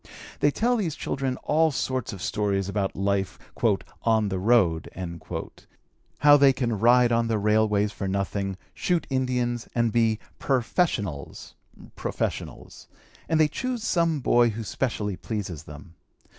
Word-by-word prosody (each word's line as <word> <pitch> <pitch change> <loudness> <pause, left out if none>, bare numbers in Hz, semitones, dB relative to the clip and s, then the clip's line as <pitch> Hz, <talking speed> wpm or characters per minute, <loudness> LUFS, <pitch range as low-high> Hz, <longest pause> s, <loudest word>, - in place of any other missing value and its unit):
They 145 - +4
tell 240 +10 +1
these 175 -9 -2
children 135 -2 -2
all 160 +1 +3
sorts 130 -3 -2
of 95 -4 -8
stories 100 -2 0
about 100 -1 -2
life 100 0 -1 0.6
"on 110 -2 +2
the 95 -1 -2
road," 95 -7 +2 1.3
how 145 0 +7
they 140 -1 +6
can 120 -5 -2
ride 120 +2 +5
on 115 0 +2
the 115 -1 +1
railways 105 0 +2
for 100 - -5
nothing, 95 0 -2 0.2
shoot 175 -4 0
Indians, 125 -2 -1
and 115 -1 +2
be 115 -1 +2 0.2
"perfeshunnels" 120 - -1 0.4
(professionals), - - -5 0.4
and 160 - +2
they 155 - +5
choose 245 - -3
some 170 -7 +1
boy 120 -1 +4
who 115 +1 -5
specially 105 -4 -2
pleases 85 -3 -5
them. 75 +3 -12
115 Hz, 135 wpm, -26 LUFS, 100-135 Hz, 1.3 s, how